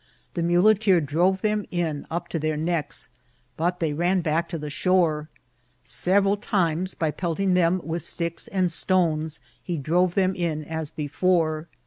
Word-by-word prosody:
The 170 - -2
muleteer 185 +3 +4
drove 175 +6 +1
them 210 -2 0
in 165 -5 -2
up 170 +1 -3
to 165 - -2
their 155 0 -1
necks, 160 -4 -2 0.5
but 175 +2 -1
they 160 -3 0
ran 175 +4 +1
back 165 +1 0
to 170 - -3
the 150 -1 -6
shore. 160 -3 +1 0.5
Several 195 +6 +2
times, 185 -3 0
by 160 -2 0
pelt 165 +2 -3
ing 195 -2 +2
them 180 0 +3
with 165 +1 -3
sticks 170 +1 -4
and 185 -3 0
stones, 160 -3 0 0.2
he 175 -2 -3
drove 175 +5 +1
them 190 -1 +2
in 165 -4 -2
as 160 -1 -4
before. 155 +1 0
170 Hz, 160 wpm, -25 LUFS, 155-185 Hz, 0.5 s, muleteer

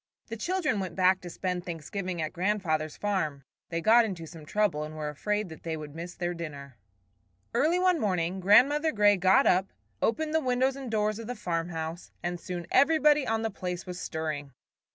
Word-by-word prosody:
The 225 - -4
children 310 - 0
went 185 -3 -4
back 185 0 +3
to 180 - -7
spend 180 0 -3
Thanksgiving 175 +1 -4
at 155 - -4
grandfather's 175 -5 -1
farm. 155 -9 -1 0.3
They 165 0 -2
got 230 +5 +6
into 185 -7 -4
some 160 -1 -12
trouble 205 -7 +1
and 155 +1 -7
were 150 -1 -3
afraid 210 +7 -2
that 160 - -11
they 160 -1 -3
would 150 -2 -8
miss 170 +2 -7
their 175 0 -2
dinner. 140 -7 -8 0.7
Early 325 +5 +3
one 365 -2 +3
morning 185 -3 0
Grandmother 280 - +5
Grey 205 -3 +5
got 185 +1 +4
up, 185 +2 +3 0.3
opened 310 +6 0
the 320 - +4
windows 260 -1 +1
and 270 -3 -6
doors 215 -1 0
of 225 - -7
the 245 - -4
farmhouse, 165 -2 -3
and 175 0 -2
soon 175 -1 -5
everybody 300 -1 +4
on 225 0 0
the 225 - -1
place 180 -2 -5
was 180 -1 -6
stirring. 150 -4 -4
185 Hz, 190 wpm, -28 LUFS, 165-225 Hz, 0.7 s, got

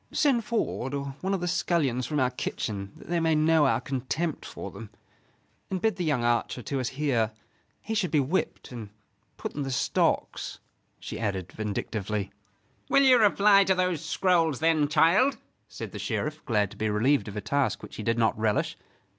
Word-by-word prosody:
"Send 265 -6 +2
Ford, 145 - -2
or 140 -1 -4
one 195 +1 0
of 185 - -4
the 180 - -1
scullions 140 -8 0
from 150 - -1
our 130 -1 +2
kitchen, 100 -5 -4
that - - -14
they 175 0 0
may 165 -1 +2
know 155 -1 +4
our - - +2
contempt 140 +5 -3
for - - -7
them. - - -9 0.8
And 190 - -2
bid 220 +3 +1
the 180 - -1
young 145 -7 +1
archer 120 +1 0
to 135 +5 -2
us 125 - -1
here; 130 -6 0 0.5
he 220 - -3
should 210 -5 +1
be 150 - +2
whipped 145 +3 -2
and 115 -4 -7 0.5
put - - -5
in 145 - -4
the 135 - -2
stocks," 125 - 0 0.4
she - - -6
added, 100 -5 -2
vindictively. 105 -1 -3 0.6
"Will 275 +1 +5
you 255 -2 +7
reply 205 -1 +6
to 190 - +3
those 180 -3 0
scrolls 165 -4 +2
then, 160 -1 +3
child?" 190 - +4 0.3
said - - -7
the - - -7
Sheriff, 155 0 -3
glad 105 -6 +1
to - - -12
be 110 0 0
relieved 110 +2 +2
of 105 0 -6
a - - -2
task 140 +7 0
which - - -9
he - - -4
did 115 +2 0
not 115 -1 +2
relish. 110 -1 +1
145 Hz, 190 wpm, -27 LUFS, 115-175 Hz, 0.8 s, you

